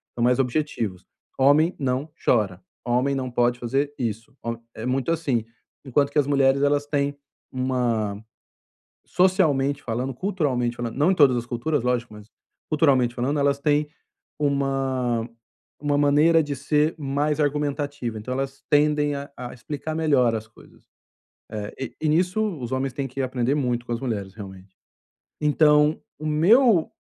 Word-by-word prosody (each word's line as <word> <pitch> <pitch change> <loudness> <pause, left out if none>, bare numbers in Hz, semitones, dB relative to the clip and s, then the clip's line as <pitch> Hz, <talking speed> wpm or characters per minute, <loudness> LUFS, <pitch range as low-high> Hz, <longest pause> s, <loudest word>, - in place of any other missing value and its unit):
São 120 - -1
mais 125 +1 +3
objetivos. 125 - -2 0.3
Homem 145 +6 +4
não 135 +2 -1
chora, 100 -6 +1 0.2
homem 125 +3 +1
não 130 -1 -3
pode 120 0 +1
fazer 135 +4 -1
isso, 115 0 -4
hom 115 0 -2 0.2
é 110 - -6
muito 130 +4 0
assim, 140 -9 0 0.4
enquanto 140 +2 +2
que 150 - +2
as 145 - +2
mulheres 140 -1 +3
elas 145 0 +2
têm 145 -1 -1 0.3
uma 120 -5 -1 0.9
socialmente 145 -7 +2
falando, 125 +3 -3
culturalmente 130 -9 -1
falando, 120 0 -4
não 150 +6 +3
em - - +1
todas 135 -6 +5
as 120 0 -3
culturas 120 +3 -1
lógico, 120 -2 -1
mas 105 +1 -13 0.4
culturalmente 135 -6 +3
falando 135 +5 -1
elas 140 0 +2
têm 150 0 +1 0.5
uma 135 -5 0 0.6
uma 145 0 +2
maneira 150 +3 +4
de 145 -1 -3
ser 150 +3 +1
mais 145 +2 -1
argumentativa, 145 -4 -1
então 120 +4 -6
elas 135 +1 -4
tendem 150 0 +3
a 140 0 -6
a 125 -1 -7
explicar 145 +5 -5
melhor 140 -7 +3
as 110 0 -4
coisas. 110 - -20 0.7
Eh, 105 -1 -5
e 135 - -1 0.2
e 155 - +1
nisso 180 +6 +2 0.2
os 120 - -4
homens 130 0 -1
têm 135 0 -3
que 135 +2 -6
aprender 130 +1 0
muito 125 -4 -1
com - - -3
as 115 - -2
mulheres 100 -6 -3
realmente. 95 -2 -11 0.8
Então, 150 0 +4 0.2
o 155 - -6
meu 180 - +4
135 Hz, 155 wpm, -24 LUFS, 120-150 Hz, 0.9 s, todas